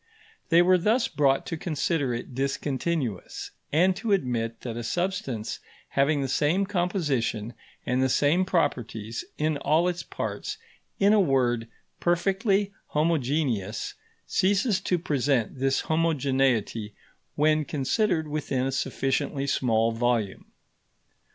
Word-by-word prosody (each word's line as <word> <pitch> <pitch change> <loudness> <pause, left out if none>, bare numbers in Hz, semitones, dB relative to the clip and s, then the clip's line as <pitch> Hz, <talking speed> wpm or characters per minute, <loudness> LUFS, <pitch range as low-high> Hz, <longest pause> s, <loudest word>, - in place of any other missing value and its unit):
They 170 0 +6
were 185 0 +5
thus 225 +7 +2
brought 135 -2 +2
to 165 - -4
consider 155 -3 -1
it 120 +2 -5
discontinuous, 135 - -2 0.2
and 180 +5 +4
to 220 -3 0
admit 120 -9 -1
that 120 -3 -5
a 120 - -4
substance 135 - -2 0.3
having 140 +1 +2
the - - -1
same 155 +9 +2
composition 150 - -1 0.3
and 125 +1 +1
the 130 - +2
same 150 +8 +3
properties 120 - -1
in 155 0 0
all 155 +5 +2
its 175 -1 -1
parts - - -5 0.4
in 200 +1 +5
a 215 - +5
word, 125 - +2 0.3
perfectly 195 +3 +1
homogeneous 140 - 0 0.3
ceases 200 +1 +2
to 180 -2 +1
present 140 -7 0
this 135 0 +2
homogeneity 135 -9 0 0.4
when 155 +1 +3
considered 160 - 0
within 145 -4 -1
a 135 - -1
sufficiently 135 +1 -1
small 115 -4 +2
volume. 115 -3 -1
145 Hz, 120 wpm, -26 LUFS, 125-175 Hz, 0.4 s, They